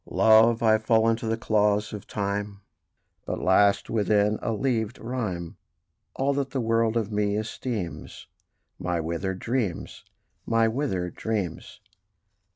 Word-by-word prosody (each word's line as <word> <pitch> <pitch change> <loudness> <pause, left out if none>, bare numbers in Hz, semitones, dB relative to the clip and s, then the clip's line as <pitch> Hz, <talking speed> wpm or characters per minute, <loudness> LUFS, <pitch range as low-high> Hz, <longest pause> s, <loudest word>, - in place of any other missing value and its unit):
Love! 115 +1 +5
I 110 -1 +4
fall 110 0 +3
into 115 +1 -1
the 115 0 0
claws 105 -1 +1
of 105 - -8
Time: 100 0 -3 0.7
But - - -3
lasts 100 +2 +3
within 105 0 +1
a - - -2
leavèd 110 -1 -1
rhyme 105 -9 -4 0.6
All 140 +1 +1
that 140 -1 -2
the 135 - -3
world 115 -1 +1
of 110 -2 -2
me 105 0 0
esteems 110 -4 -5 0.5
My 90 -1 -1
withered 85 +4 -3
dreams, 115 -4 -3 0.4
my 115 0 +2
withered 110 - -2
dreams. 105 -7 -4
110 Hz, 130 wpm, -26 LUFS, 100-115 Hz, 0.7 s, Love